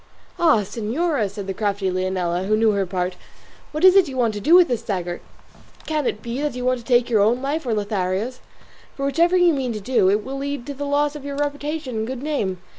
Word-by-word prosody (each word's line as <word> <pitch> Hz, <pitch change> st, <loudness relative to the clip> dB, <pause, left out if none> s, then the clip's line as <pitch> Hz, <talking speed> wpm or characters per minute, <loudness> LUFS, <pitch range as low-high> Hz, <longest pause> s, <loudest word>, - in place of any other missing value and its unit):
"Ah, 315 Hz, -10 st, +4 dB
señora," 230 Hz, -, -1 dB
said 200 Hz, 0 st, -7 dB
the 195 Hz, -, -3 dB
crafty 200 Hz, -1 st, -1 dB
Leonela, 185 Hz, -1 st, -1 dB
who 215 Hz, +1 st, +2 dB
knew 220 Hz, 0 st, +4 dB
her 200 Hz, -2 st, 0 dB
part, 180 Hz, 0 st, -2 dB, 0.6 s
"what 305 Hz, +3 st, -4 dB
is 375 Hz, 0 st, +8 dB
it 385 Hz, -3 st, +6 dB
you 265 Hz, -2 st, -6 dB
want 235 Hz, -3 st, +2 dB
to 205 Hz, -, -4 dB
do 315 Hz, -, +5 dB
with 360 Hz, -1 st, +7 dB
this 245 Hz, -3 st, -1 dB
dagger? 180 Hz, -3 st, -3 dB, 0.6 s
Can 305 Hz, -4 st, -1 dB
it 210 Hz, -, -3 dB
be 235 Hz, +3 st, -4 dB
that 295 Hz, -4 st, -2 dB
you 250 Hz, -, -4 dB
mean 255 Hz, 0 st, +2 dB
to -, -, -13 dB
take 245 Hz, 0 st, +3 dB
your 220 Hz, -4 st, +3 dB
own 225 Hz, +4 st, +3 dB
life, 285 Hz, +1 st, -2 dB
or 225 Hz, -, +1 dB
Lothario's? 205 Hz, +3 st, -2 dB, 0.6 s
for 275 Hz, -, -3 dB
whichever 340 Hz, +6 st, +3 dB
you 350 Hz, -2 st, +5 dB
mean 260 Hz, -4 st, -2 dB
to 215 Hz, -, -4 dB
do, 205 Hz, -3 st, +2 dB
it 205 Hz, +1 st, +1 dB
will 270 Hz, +1 st, -5 dB
lead 280 Hz, -3 st, -4 dB
to 285 Hz, -, -5 dB
the 285 Hz, +1 st, -5 dB
loss 290 Hz, +1 st, +1 dB
of 295 Hz, -, -8 dB
your 280 Hz, 0 st, -5 dB
reputation 290 Hz, -2 st, -3 dB
and 220 Hz, 0 st, -2 dB
good 260 Hz, +1 st, -5 dB
name. 220 Hz, -12 st, -1 dB
245 Hz, 240 wpm, -22 LUFS, 205-285 Hz, 0.6 s, is